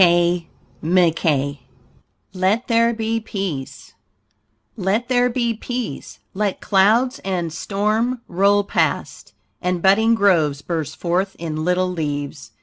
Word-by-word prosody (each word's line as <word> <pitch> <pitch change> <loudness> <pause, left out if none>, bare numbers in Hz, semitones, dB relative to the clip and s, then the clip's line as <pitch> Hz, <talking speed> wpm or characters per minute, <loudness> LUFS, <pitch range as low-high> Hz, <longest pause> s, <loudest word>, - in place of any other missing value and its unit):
KAY 175 -1 +4 0.3
MCKEE 160 -4 +1 0.7
LET 195 +6 +1
THERE 230 0 +3
BE 225 0 -1
PEACE 195 -11 -5 0.8
Let 210 +5 -1
there 250 -1 +3
be 235 -1 0
peace, 240 - -5 0.2
let 200 0 -1
clouds 220 +7 +3
and 175 -4 -3
storm 215 +7 -1
roll 200 +3 +3
past, - - -2 0.3
And 180 -1 0
budding 220 +5 +4
groves 160 -9 +2
burst 160 -3 -3
forth 185 +3 -1
in 155 -2 -4
little 180 +1 +1
leaves. 145 -5 -4
190 Hz, 115 wpm, -21 LUFS, 170-220 Hz, 0.8 s, KAY